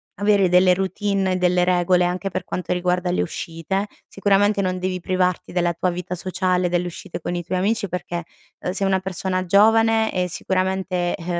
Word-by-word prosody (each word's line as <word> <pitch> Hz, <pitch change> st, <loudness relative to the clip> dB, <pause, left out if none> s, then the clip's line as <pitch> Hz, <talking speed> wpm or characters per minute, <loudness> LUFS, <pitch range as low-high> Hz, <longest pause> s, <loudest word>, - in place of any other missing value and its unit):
avere 200 Hz, -2 st, +3 dB
delle 180 Hz, 0 st, +5 dB
routine 195 Hz, 0 st, -1 dB
e -, -, 0 dB
delle 180 Hz, 0 st, +2 dB
regole 180 Hz, 0 st, +3 dB
anche 180 Hz, +2 st, -2 dB
per -, -, -3 dB
quanto 180 Hz, 0 st, -3 dB
riguarda 180 Hz, 0 st, 0 dB
le -, -, +1 dB
uscite, 170 Hz, +5 st, -3 dB, 0.2 s
sicuramente 200 Hz, +1 st, +2 dB
non 185 Hz, -1 st, -1 dB
devi 185 Hz, 0 st, -2 dB
privarti 185 Hz, 0 st, -1 dB
della 175 Hz, -1 st, +1 dB
tua 180 Hz, +2 st, -1 dB
vita 180 Hz, +1 st, -5 dB
sociale, 185 Hz, 0 st, 0 dB
delle 175 Hz, 0 st, 0 dB
uscite 175 Hz, 0 st, -7 dB
con 175 Hz, -, -3 dB
i 175 Hz, -, -3 dB
tuoi 180 Hz, +2 st, -2 dB
amici, 205 Hz, +1 st, 0 dB
perché, 175 Hz, -1 st, -4 dB, 0.4 s
uhm, 180 Hz, -, -2 dB
sei 195 Hz, 0 st, 0 dB
una 190 Hz, -1 st, +2 dB
persona 185 Hz, 0 st, -2 dB
giovane 220 Hz, +3 st, +4 dB
e 180 Hz, -1 st, 0 dB
sicuramente, 185 Hz, 0 st, -1 dB
uhm, 165 Hz, -, -10 dB
185 Hz, 185 wpm, -22 LUFS, 180-195 Hz, 0.4 s, delle